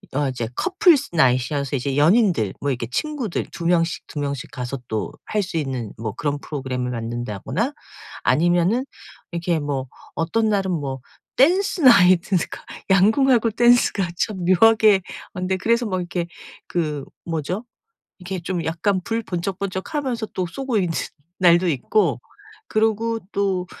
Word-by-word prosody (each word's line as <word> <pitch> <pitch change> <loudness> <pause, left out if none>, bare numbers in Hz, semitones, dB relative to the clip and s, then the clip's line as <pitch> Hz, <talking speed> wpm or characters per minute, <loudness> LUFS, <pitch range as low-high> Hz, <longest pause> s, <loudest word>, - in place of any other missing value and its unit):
어 145 -1 +1
이제 125 -3 -3
couple's 365 - +3
night이여서 140 -1 +2
이제 135 +1 -2
연인들 165 - +3
뭐 140 0 0
이렇게 120 -2 -3
친구들 270 - -2
2 170 - -7
명씩, 170 -1 +1
2 150 - -6
명씩 140 -2 -3
가서 125 +2 -5
또 110 -1 -3
할 210 -1 0
수 180 -3 -4
있는 130 -7 -3
뭐 110 -2 -4
그런 145 +4 -2
프로그램을 130 -4 -4
만든다거나 120 - -3 0.5
아니면은 175 +8 +3 0.5
이렇게 170 -1 -1
뭐 140 -3 -2 0.3
어떤 215 +7 +1
날은 195 -2 +1
뭐 140 -6 -3 0.4
dance 360 +5 +3
night 185 -7 +6
그러니까 185 -4 -1 0.3
양궁하고 230 +4 +4
댄스가 240 -5 +3
참 195 -5 -2
묘하게 215 +1 +5 0.3
아 - - -6
근데 185 +1 0
그래서 235 +5 +1
뭐 185 -2 -1
이렇게 175 -1 -3 0.4
그 150 -5 -2 0.2
뭐죠? 170 - -3 0.6
이렇게 185 0 -5
좀 175 -1 -3
약간 185 +4 0
불 230 0 -1
번쩍번쩍하면서 200 - -3
또 185 - -1
쏘고 260 +7 -3
있는 180 -4 0 0.5
날도 175 0 +5
있고 160 - +1 0.5
그리고 225 +1 +1
또 190 -2 0
180 Hz, 335 characters per minute, -22 LUFS, 145-220 Hz, 0.6 s, night